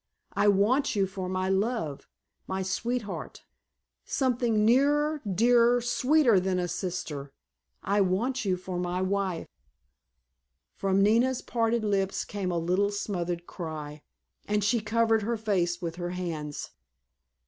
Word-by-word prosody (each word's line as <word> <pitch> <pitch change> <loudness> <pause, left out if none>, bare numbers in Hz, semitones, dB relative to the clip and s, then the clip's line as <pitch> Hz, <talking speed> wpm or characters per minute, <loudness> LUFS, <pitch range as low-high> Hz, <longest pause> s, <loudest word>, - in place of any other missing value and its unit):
I - - +2
want 215 +8 +3
you 200 -1 +3
for 190 -1 -5
my 185 0 -1
love, 190 - -1 0.4
my 190 0 -2
sweetheart, 225 +3 -3 0.6
something 240 -5 +1
nearer, 290 +5 +3
dearer, 240 +4 +4
sweeter 245 -1 +3
than 185 0 0
a 180 -1 0
sister—I 180 +2 -4
want 225 +8 0
you 190 -3 0
for 180 0 -5
my 180 0 -2
wife!" 190 -3 -1 1.3
From 195 0 +1
Nina's 240 +5 +3
parted 230 -1 0
lips 195 -2 0
came 195 -3 -3
a 175 - -1
little 180 +5 +1
smothered 175 -4 -3
cry, 155 -4 -7 0.5
and 210 0 +1
she 225 +4 +2
covered 225 +1 +2
her 230 +3 -1
face 185 -5 0
with 165 0 -4
her 175 -1 -3
hands. 165 -5 -5
200 Hz, 125 wpm, -28 LUFS, 180-230 Hz, 1.3 s, dearer